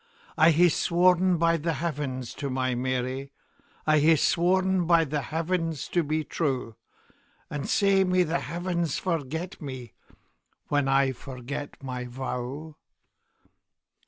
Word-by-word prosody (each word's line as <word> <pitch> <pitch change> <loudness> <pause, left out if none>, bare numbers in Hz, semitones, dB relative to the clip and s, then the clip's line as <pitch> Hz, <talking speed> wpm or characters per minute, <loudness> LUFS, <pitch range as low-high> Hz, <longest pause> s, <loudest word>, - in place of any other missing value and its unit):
I 160 +1 +6
hae 170 +2 +5
sworn 180 +2 +3
by 165 0 +3
the 165 +1 -1
Heavens 140 -5 -3
to 140 - -4
my 130 -1 0
Mary,I 130 +4 -2
hae 160 +2 +5
sworn 185 +3 +2
by 170 -1 +5
the 150 0 -2
Heavens 165 0 -2
to 175 - +2
be 155 0 -1
true; 130 -8 -2 0.8
And 145 -1 -4
sae 195 -1 +4
may 180 -1 +3
the 170 0 -1
Heavens 170 0 -2
forget 165 +1 -3
me, 130 -6 -7 0.8
When 145 -2 +1
I 135 0 +3
forget 135 +2 -7
my 125 -1 -4
vow! 130 +4 -5
155 Hz, 125 wpm, -27 LUFS, 135-170 Hz, 0.8 s, I